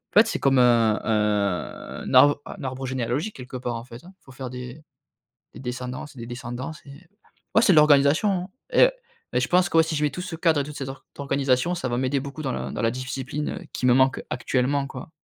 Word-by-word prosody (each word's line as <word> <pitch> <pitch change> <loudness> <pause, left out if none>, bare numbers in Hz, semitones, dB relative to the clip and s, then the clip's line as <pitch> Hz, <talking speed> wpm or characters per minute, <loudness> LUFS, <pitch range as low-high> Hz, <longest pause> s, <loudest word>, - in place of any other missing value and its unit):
En - - +9
fait, 225 - +6
c'est - - -2
comme 135 -2 +3
un 115 -3 +4
un 105 -4 -1
un - - -5
arbre 145 0 +6
un - - -9
arbre 130 0 -4
généalogique 130 - -2
quelque 130 0 -7
part, 120 -1 -3
en 115 - -5
fait, 120 -1 -12
hein. 185 +2 -14
Il - - -36
faut 135 - -14
faire 130 -1 -7
des 125 +3 -8 0.7
des - - -10
descendances 125 +3 -6
des 115 -1 -7
descendances 120 +5 -6
et 140 - -13 0.6
ouais, 220 - +5
c'est 195 - +5
de - - +4
l'organisation 150 +5 +5 0.2
hein, 185 - -11 0.2
et - - +6 0.4
mais - - +2
je - - +1
pense 180 0 +3
que 165 - +4
si 160 0 -3
je 150 - -1
mets 150 - +2
tout - - -7
ce 180 -2 -5
cadre 160 -2 +2
et - - -1
toute 150 +1 -9
cette 135 -1 -5
or 135 0 -9
organisation, 140 +3 +1
ça 130 - -3
va 120 - -1
m'aider 130 +2 +1
beaucoup 140 +3 -7
dans 135 -3 -2
la - - -4
dans - - -3
la 115 - +3
discipline, 130 +3 -4
heu, - - -6
qui 125 - -1
me 125 - +6
manque 130 +1 +3
actuellement, 135 +3 0
quoi. 130 +3 -9
135 Hz, 240 wpm, -24 LUFS, 125-150 Hz, 0.7 s, En